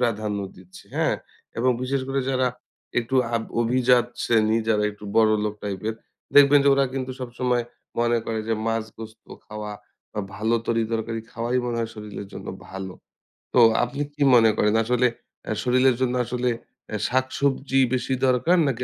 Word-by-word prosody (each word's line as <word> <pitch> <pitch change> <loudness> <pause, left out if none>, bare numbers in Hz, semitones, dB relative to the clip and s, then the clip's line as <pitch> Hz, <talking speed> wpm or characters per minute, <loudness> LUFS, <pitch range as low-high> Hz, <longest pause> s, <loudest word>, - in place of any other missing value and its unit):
প্রাধান্য 110 -4 0 0.2
দিচ্ছে। 95 0 -15
হ্যাঁ? - - +2 0.4
এবং 125 +2 +3
বিশেষ 135 +1 0
করে 135 0 0
যারা 130 -1 +2 0.5
একটু 120 +3 -3 0.2
আভ 115 - +1 0.2
অভিজাত 125 0 +3 0.2
শ্রেণী 110 -1 +3
যারা 105 -2 +3
একটু 105 0 -13
বড় 110 -1 +6
লোক 105 - -2
টাইপের 105 +2 -3 0.4
দেখবেন 145 0 +8
যে - - +5
ওরা 140 0 +3
কিন্তু 130 -1 -3
সবসময় 125 0 -1 0.3
মনে 120 0 +2
করে 110 -1 -2
যে 115 - +2
মাছ, 115 -1 0
গোস্ত 110 0 -10 0.2
খাওয়া 105 -1 -6 0.4
বা 105 - -2
ভালো 110 +3 0
তরি-তরকারি 115 0 -1
খাওয়াই 120 +2 -1
মনে 120 -1 -2
হয় 115 -1 -2
শরীরের 105 -2 -7
জন্য - - -8 0.2
ভালো। 95 -1 -6 0.6
তো 125 - +5 0.2
আপনি 125 +4 -3
কি 145 - -11
মনে 115 -2 +6
করেন? 105 +1 +3
আসলে 125 +2 +2 0.4
আ - - 0
শরীরের 130 0 +4
জন্য 125 -1 +1
আসলে 125 +1 -1 0.4
এ - - 0
শাক-সবজি 135 +1 +1
বেশি 130 +1 0
দরকার 130 +8 +3
নাকি 125 -2 -1
120 Hz, 165 wpm, -24 LUFS, 110-130 Hz, 0.6 s, দেখবেন